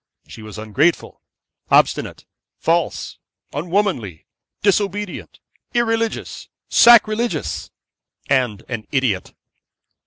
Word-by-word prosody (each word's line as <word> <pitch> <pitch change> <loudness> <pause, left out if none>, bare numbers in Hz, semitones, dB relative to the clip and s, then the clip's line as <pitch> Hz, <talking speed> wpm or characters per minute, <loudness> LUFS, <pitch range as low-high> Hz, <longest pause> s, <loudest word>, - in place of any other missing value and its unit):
She - - -11
was 110 -1 -10
ungrateful, 130 +11 0 0.5
obstinate, - - +2 0.3
false, 170 0 -1 0.3
unwomanly, 165 - -1 0.4
disobedient, 205 0 -1 0.4
irreligious, 225 -1 -1 0.2
sacrilegious, 235 0 +4 0.6
and 125 -7 0
an 115 -4 -5
idiot. 125 -9 -1
170 Hz, 70 wpm, -20 LUFS, -, 0.6 s, sacrilegious